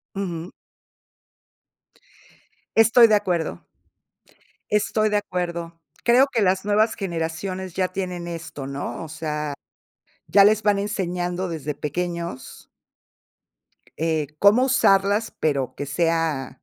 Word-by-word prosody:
Ujú. 175 -3 -4 2.2
Estoy 225 +1 +7
de 215 - +4
acuerdo. 170 - -1 1.1
Estoy 215 +1 +1
de 210 - +2
acuerdo. 170 -3 -4 0.2
Creo 250 +3 +5
que 230 - +2
las 190 0 +1
nuevas 215 +2 +2
generaciones 185 +1 -4
ya 185 -1 0
tienen 180 -2 -4
esto, 165 -5 -7
¿no?, 140 +4 -5
o - - -7
sea, 150 -2 -4 0.7
ya 200 -1 +6
les 215 +1 +4
van 205 -1 +2
enseñando 180 -2 -2
desde 150 -3 -4
pequeños 170 0 -5 1.3
eh, 160 -2 0
cómo 210 +6 +5
usarlas, 205 -4 +3
pero 140 -4 -1
que 145 - -4
sea 165 -2 0
180 Hz, 110 wpm, -23 LUFS, 160-205 Hz, 2.2 s, Estoy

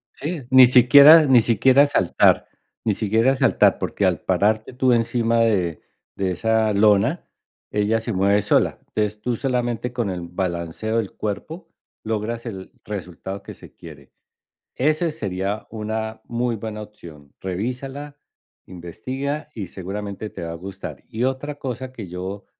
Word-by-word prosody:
Sí, 155 -1 -5
ni 130 -1 +9
siquiera 140 +6 +8
ni 130 -4 +6
siquiera 130 +5 +4
saltar. 95 -11 +2 0.4
Ni 110 - +2
siquiera 110 +5 +2
saltar, 130 0 +3
porque - - -1
al - - +1
pararte 110 +3 0
tú 125 0 +2
encima 115 0 +1
de 90 -9 +1 0.3
de 95 -1 -1
esa 110 +3 +1
lona, 105 - +2 0.4
ella 105 +2 +1
se 115 0 -4
mueve 100 +2 +2
sola. 105 - +1
Es 105 0 -1
tú 120 +2 -2
solamente 125 -2 -2
con 120 -5 -2
el 90 -1 -5
balanceo 85 +4 -3
del 110 -4 -2
cuerpo 155 - -6 0.3
logras 110 +2 -3
el 95 -5 -7
resultado 95 -1 -6
que - - -10
se - - -15
quiere. 70 -5 -14 0.6
Ese 155 +4 +1
sería 100 -4 -4
una 110 0 -4
muy 120 0 -2
buena 110 0 -6
opción, 80 -9 -14
revísala, 130 +9 -5 0.5
investiga, 130 - -5
y 100 -6 -6
seguramente 100 +3 -6
te - - -9
va 85 - -4
a - - -6
gustar. 95 +2 -9
Y 110 - -4
otra 135 +3 -2
cosa 130 -2 -6
que 110 -7 -8
yo 95 +3 -6
110 Hz, 145 wpm, -22 LUFS, 100-125 Hz, 0.6 s, ni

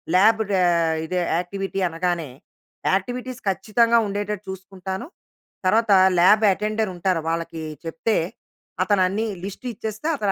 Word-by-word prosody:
Lab 220 +4 +5
ర - - +1 0.5
ఇది 180 +3 -3 0.2
activity 195 +2 -3
అనగానే 170 -2 -2 0.6
యాక్టివిటీస్ 245 +5 -2
ఖచ్చితంగా! 230 +5 +2
ఉండేటట్టు 205 0 -3
చూసుకుంటాను. 190 +2 -6 0.6
తర్వాత 220 +2 +3 0.3
ల్యాబ్ 210 +5 +6
అటెండర్ 215 +1 -1
ఉంటారు. 175 -1 0
వాళ్ళకి 165 0 -3 0.2
చెప్తే 165 +7 0 0.7
అతను 195 0 +2
అన్ని 210 +4 -1 0.2
లిస్ట్ 200 +5 -8
ఇచ్చేస్తే, 215 +6 -5
అతను 205 -5 0
195 Hz, 115 wpm, -23 LUFS, 185-215 Hz, 0.7 s, ల్యాబ్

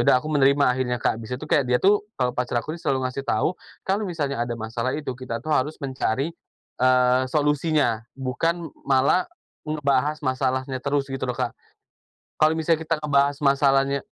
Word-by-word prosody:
udah - - +5
aku 150 - -7
menerima 140 -1 +4
akhirnya, 125 -1 0
Kak. - - +1
Bis 115 +2 -8
itu - - -8
kayak 145 - +3
dia 125 - +3
tuh, 205 +2 +3 0.2
eee, 125 -1 +1
pacar 120 -1 0
aku 155 +7 -6
tuh 170 - -14
selalu 130 -1 0
ngasih 135 +2 -5
tahu, 110 - +1 0.4
"Kalau 200 +3 0
misalnya 155 -7 -2
ada 120 - -4
masalah 115 +3 -2
itu 145 -3 -3
kita 125 -2 -5
tuh - - -9
harus 150 +2 +1
mencari, 135 0 -1 0.5
eee, 125 0 +4
solusinya, 150 -6 +1
bukan 160 +6 -2 0.2
malah 140 +6 +3 0.4
ngebahas 150 -1 0
masalahnya 130 -1 -1
terus." 140 -1 0
Gitu 135 -1 -3
loh, 125 -1 -3
Kak. 125 -3 -2 0.8
Kalau 155 +1 +4
misalnya 160 0 +1
kita 165 - +1
ngebahas 140 -1 +2
masalahnya 140 0 +3
135 Hz, 175 wpm, -24 LUFS, 130-150 Hz, 0.8 s, udah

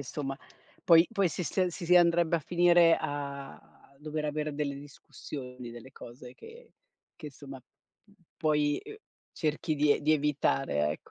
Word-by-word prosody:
insomma 135 0 -5 0.5
poi 165 0 +6
poi 200 -5 +1
si 180 - -4
sta 185 +2 0
si 170 0 -7
si 180 +1 +6
andrebbe 170 -1 +4
a - - -1
finire 175 +1 +4
a 140 -1 -5 0.4
dover 150 0 -4
avere 150 0 -3
delle 145 -1 -2
discussioni, 130 -3 -10
delle 120 +2 -11
cose 125 0 -12
che 470 +2 -15 0.4
che, 155 - -10
insomma, 135 -2 -11 0.8
poi, 150 -2 +1
uhm, 430 - -10 0.4
cerchi 155 0 -2
di 145 0 +3
ev - - -2
di 155 - +3
evitare, 75 - 0
ecco. 75 - -8
150 Hz, 150 wpm, -29 LUFS, 140-170 Hz, 0.8 s, poi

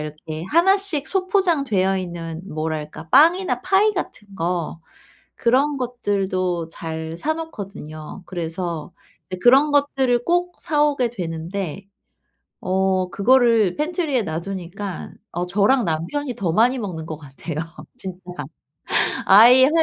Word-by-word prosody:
이렇게 155 +1 -6
1 380 +4 +5
씩 315 -7 -1
소포장되어 310 - +1
있는 170 -2 -6
뭐랄까 155 0 -4
빵이나 340 +7 +4
파이 415 +2 +3
같은 210 - -6
거 170 -1 -2 0.6
그런 275 +5 +2
것들도 190 -8 -1
잘 160 0 -6
사 315 +2 -1
놓거든요. 195 - -8
그래서 170 -2 -4 0.4
이제 185 - -4
그런 275 +4 +6
것들을 265 -4 +2
꼭 350 +1 +1
사 300 -3 +1
오게 260 -5 +1
되는데 180 -1 -5 0.8
어 185 0 +1
그거를 230 -3 +3
팬트리에 305 - 0
놔두니까 185 +3 -5 0.2
어 175 +1 -2
저랑 205 +6 +3
남편이 230 - -2
더 185 -8 -1
많이 245 +6 +3
먹는 170 -7 -5
것 155 - -5
같아요, 145 +2 -8 0.4
진짜. 185 -1 -8 1.0
아이 240 +6 +8
해 - - +3
200 Hz, 250 characters per minute, -22 LUFS, 170-275 Hz, 1.0 s, 아이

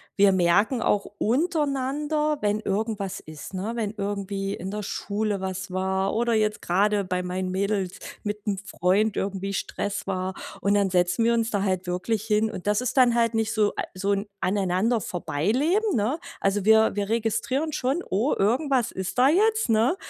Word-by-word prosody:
wir 200 -1 +5
merken 190 +7 +3
auch 205 -3 +1
untereinander, 295 +2 0
wenn 210 +1 0
irgendwas 200 -1 -2
ist, 155 +3 -10
ne, 200 +5 -3
wenn 220 -3 -2
irgendwie 200 -1 -3
in 190 0 -5
der 210 0 -3
Schule 205 0 -2
was 190 0 -4
war 190 +1 0
oder 235 +1 +1
jetzt 215 -1 +1
grade 200 +3 +2
bei 180 0 -2
meinen 185 +1 -3
Mädels 195 -1 -1 0.3
mit 210 0 -4
dem 205 -2 0
Freund 195 +2 +1
irgendwie 195 0 -2
Stress 200 +1 -3
war. 185 -1 -2 0.3
Und 200 +1 +2
dann 200 -1 +2
setzen 180 +4 +2
wir 235 - +4
uns 230 0 +1
da 200 -2 0
halt 185 -2 -1
wirklich 195 +4 -1
hin. 220 0 +2
Und 185 -4 -8
das 210 0 +3
ist 250 - -2
dann 250 -2 +6
halt 230 -1 +2
nicht 225 0 0
so 215 -2 +2
a - - 0
so 195 +2 -1
'n 200 +1 -1 0.2
aneinander 200 +4 +1
vorbei 175 0 -2
leben, 350 - +2
ne? 235 +8 0 0.2
Also, 195 0 +1
wir 220 -1 +5
wir 205 -1 -1
registrieren 230 +7 0
schon: 280 +6 -1
„Oh, 215 +10 +1
irgendwas 250 +4 +2
ist 190 +5 -4
da 255 - +6
jetzt, 435 +7 +3
ne? 225 +8 +3
205 Hz, 180 wpm, -25 LUFS, 190-230 Hz, 0.3 s, dann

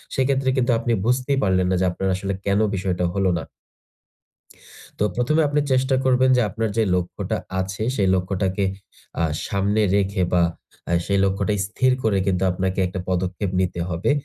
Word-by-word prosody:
সেক্ষেত্রে 135 0 +1
কিন্তু 125 -1 +2
আপনি 120 +1 -2
বুঝতেই 130 +3 +1
পারলেন 95 -2 +2
না - - +2
যে - - +3
আপনার 95 +2 -3
আসলে 95 +1 -3
কেন 100 0 +2 0.2
বিষয়টা 90 -2 -1
হল 95 +1 0
না। - - -4 1.5
তো - - 0
১ম 125 +5 +1
এ - - +3
আপনি 150 - +1
চেষ্টা 130 +1 +2
করবেন 130 0 +4
যে - - +4
আপনার 110 +2 -2
যে 115 - +4
লক্ষ্যটা 90 -1 -2 0.2
আছে, 95 +2 -4
সেই 100 -5 +2
লক্ষ্যটাকে 95 +1 -1 0.6
আ - - +2 0.2
সামনে 100 +2 +1
রেখে 100 -1 +1
বা 90 - +4 0.5
আ - - -1
সেই 100 -1 +1
লক্ষ্যটা 100 +2 0
স্থির 130 +5 +1
করে 105 -3 +2
কিন্তু 95 -1 +1
আপনাকে 95 +1 -2
একটা 95 +1 -5
পদক্ষেপ 95 +1 -1
নিতে 90 -1 -2
হবে। 85 0 -1
100 Hz, 175 wpm, -22 LUFS, 95-120 Hz, 1.5 s, করবেন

